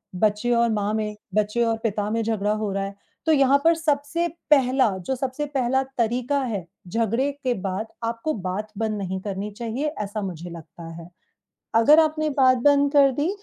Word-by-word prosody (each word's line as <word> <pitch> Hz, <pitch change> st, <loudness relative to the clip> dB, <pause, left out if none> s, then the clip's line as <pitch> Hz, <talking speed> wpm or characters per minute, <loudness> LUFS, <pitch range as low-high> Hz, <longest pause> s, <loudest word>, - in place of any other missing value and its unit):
बच्चे 210 Hz, +4 st, +1 dB
और 235 Hz, 0 st, +3 dB
माँ 210 Hz, -1 st, 0 dB
में, 215 Hz, -1 st, -2 dB, 0.2 s
बच्चे 215 Hz, +3 st, +1 dB
और 225 Hz, -1 st, 0 dB
पिता 210 Hz, -2 st, -1 dB
में 230 Hz, +1 st, 0 dB
झगड़ा 210 Hz, -2 st, 0 dB
हो 215 Hz, -1 st, -1 dB
रहा 195 Hz, 0 st, -1 dB
है। 195 Hz, 0 st, -7 dB, 0.3 s
तो 320 Hz, -, +3 dB
यहाँ 275 Hz, -2 st, +5 dB
पर 330 Hz, 0 st, +6 dB
सबसे 315 Hz, +1 st, 0 dB, 0.2 s
पहला, 260 Hz, -3 st, +4 dB
जो 190 Hz, +9 st, -3 dB
सबसे 265 Hz, +3 st, -3 dB
पहला 265 Hz, -2 st, +1 dB, 0.2 s
तरीका 245 Hz, +4 st, 0 dB
है, 210 Hz, -8 st, -3 dB, 0.2 s
झगड़े 230 Hz, +7 st, 0 dB
के 255 Hz, -2 st, +1 dB
बाद 195 Hz, +3 st, -3 dB, 0.2 s
आपको 230 Hz, +7 st, -2 dB
बात 200 Hz, +2 st, -4 dB
बंद 220 Hz, -1 st, -1 dB
नहीं 190 Hz, -1 st, -3 dB
करनी 200 Hz, +1 st, -4 dB
चाहिए, 235 Hz, +7 st, -3 dB
ऐसा 205 Hz, +1 st, -4 dB
मुझे 175 Hz, -3 st, -6 dB
लगता 170 Hz, 0 st, -10 dB
है। 170 Hz, +1 st, -10 dB, 0.7 s
अगर 260 Hz, +8 st, +7 dB
आपने 310 Hz, -1 st, +2 dB
बात 255 Hz, -1 st, +5 dB
बंद 285 Hz, -1 st, +4 dB
कर 280 Hz, -2 st, +6 dB
दी, 290 Hz, +6 st, -1 dB
230 Hz, 185 wpm, -24 LUFS, 205-275 Hz, 0.7 s, अगर